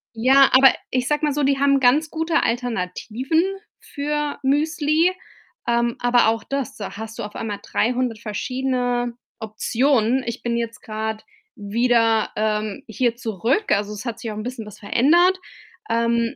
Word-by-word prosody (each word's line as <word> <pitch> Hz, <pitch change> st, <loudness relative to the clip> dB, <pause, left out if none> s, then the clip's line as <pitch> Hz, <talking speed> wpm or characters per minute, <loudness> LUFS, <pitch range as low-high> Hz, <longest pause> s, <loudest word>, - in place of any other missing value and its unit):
ja, 265 Hz, +4 st, +5 dB
aber 265 Hz, +1 st, +8 dB, 0.2 s
ich 255 Hz, 0 st, 0 dB
sag 295 Hz, +1 st, 0 dB
mal 295 Hz, -2 st, +2 dB
so, 295 Hz, -, -1 dB
die 275 Hz, 0 st, +2 dB
haben 275 Hz, 0 st, +4 dB
ganz 275 Hz, +5 st, +3 dB
gute 325 Hz, +1 st, 0 dB
Alternativen 240 Hz, -, -1 dB, 0.4 s
für 295 Hz, 0 st, -3 dB
Müsli, 305 Hz, +4 st, +2 dB, 0.6 s
ähm, 235 Hz, 0 st, +1 dB
aber 245 Hz, -1 st, +3 dB
auch 225 Hz, -1 st, -1 dB
das 275 Hz, +1 st, -4 dB
da 195 Hz, -2 st, -7 dB
hast 220 Hz, 0 st, -7 dB
du -, -, -3 dB
auf 210 Hz, 0 st, -8 dB
einmal 210 Hz, -3 st, -4 dB
300 245 Hz, -1 st, -1 dB
verschiedene 245 Hz, +2 st, -2 dB, 0.3 s
Optionen. 235 Hz, +3 st, +1 dB
Ich 235 Hz, +1 st, -5 dB
bin 235 Hz, -1 st, -1 dB
jetzt 230 Hz, -2 st, -4 dB
grad 220 Hz, 0 st, -5 dB, 0.3 s
wieder, 225 Hz, +1 st, +1 dB
ähm, 215 Hz, -1 st, -2 dB
hier 235 Hz, +1 st, 0 dB
zurück. 235 Hz, -, -1 dB
Also 205 Hz, +1 st, +1 dB
es 210 Hz, +3 st, -8 dB
hat 235 Hz, -2 st, -4 dB
sich 230 Hz, -, -5 dB
auch 210 Hz, -, -6 dB
'n 215 Hz, -, -4 dB
bisschen 245 Hz, -2 st, -6 dB
was 210 Hz, -, -12 dB
verändert, 345 Hz, -, +3 dB, 0.5 s
ähm, 235 Hz, 0 st, +1 dB
240 Hz, 160 wpm, -22 LUFS, 220-275 Hz, 0.6 s, aber